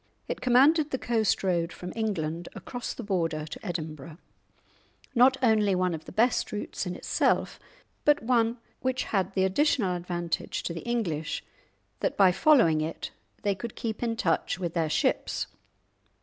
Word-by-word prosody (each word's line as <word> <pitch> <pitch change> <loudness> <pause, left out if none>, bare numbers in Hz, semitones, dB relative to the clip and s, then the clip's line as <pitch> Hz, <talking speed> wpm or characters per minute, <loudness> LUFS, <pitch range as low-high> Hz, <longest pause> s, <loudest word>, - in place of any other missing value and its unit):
It - - -4
commanded 285 +5 +5
the 260 - -1
coast 225 -6 +1
road 170 -3 +1
from 180 0 -7
England 175 -7 -2
across 245 -2 -5
the 240 - -6
Border 165 -6 -1
to 155 - -9
Edinburgh, 155 -4 -5 1.0
not 260 +2 +5
only 215 -4 +4
one 180 -1 +1
of 160 -1 -6
the - - -9
best 235 +5 +2
routes 205 -2 -4
in 180 - -3
itself, - - 0 0.4
but 295 -3 +4
one 230 -1 +2 0.2
which 260 0 -1
had 195 -2 -1
the 190 - +3
additional 200 -2 +2
advantage 175 -1 -3
to 170 - -3
the 165 - -6
English 170 -11 -1 0.6
that - - -1
by 190 -2 +6
following 180 - +4
it 160 +1 -4 0.3
they 205 -1 +2
could 215 +4 -7
keep 220 -2 -4
in 230 -1 0
touch 180 -4 0
with 175 -3 -3
their 165 -3 0
ships. - - 0
195 Hz, 160 wpm, -28 LUFS, 170-235 Hz, 1.0 s, by